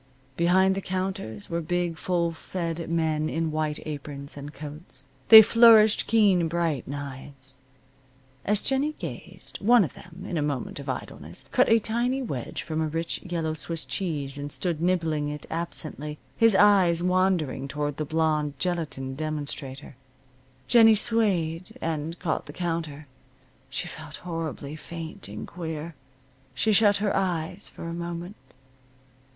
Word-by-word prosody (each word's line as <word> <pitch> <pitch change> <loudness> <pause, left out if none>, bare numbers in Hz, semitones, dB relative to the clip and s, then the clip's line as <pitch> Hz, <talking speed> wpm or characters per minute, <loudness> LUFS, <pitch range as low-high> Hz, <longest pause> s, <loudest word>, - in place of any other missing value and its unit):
Behind 185 +4 +4
the 195 - -3
counters 185 - -4
were 170 0 -2
big, 175 +1 -1
full 170 0 0
fed 165 0 -4
men 160 -2 0
in 160 0 -1
white 155 -1 -1
aprons, 145 -2 -5
and 145 +1 -7
coats. 150 -2 -10 0.2
They 220 -1 +12
flourished 225 -1 +6
keen 200 -6 +4
bright 165 -5 -1
knives. 135 -1 -8 0.8
As 210 0 +2
Jennie 280 +3 +2
gazed, - - -8
one 235 +1 +6
of 150 - -4
them, 185 +2 -12
in 175 - -2
a - - 0
moment 145 -4 -3
of - - -7
idleness, - - -5
cut - - +4
a 225 - +6
tiny 240 +4 0
wedge 140 - -4
from 160 -1 -2
a 160 - 0
rich 165 +2 -3
yellow 165 -3 -2
Swiss 165 +1 -3
cheese 145 -7 -3
and 145 0 -5
stood 170 -2 -2
nibbling 165 -4 +1
it 150 0 -6
absently, 155 -2 -3 0.2
his 225 -3 +5
eyes 190 -4 +5
wandering 180 -7 +1
toward 145 0 -3
the 155 - -1
blonde 155 -1 0
gelatine 160 -7 -2
demonstrator. 145 -2 -4 0.7
Jennie 225 -2 +7
swayed, 190 -7 0
and 160 +1 -3
caught 170 -3 -2
the 145 - -9
counter. 165 -4 -3 0.6
She 130 +7 -4
felt 155 -2 -9
horribly 160 -4 -4
faint 165 -3 -8
and 105 +1 -7
queer. 165 -1 -6 0.6
She 220 - +2
shut 205 -1 +5
her 205 0 0
eyes 180 0 -2
for - - -11
a 170 0 -4
moment. 170 +3 -5
165 Hz, 145 wpm, -26 LUFS, 150-185 Hz, 0.8 s, They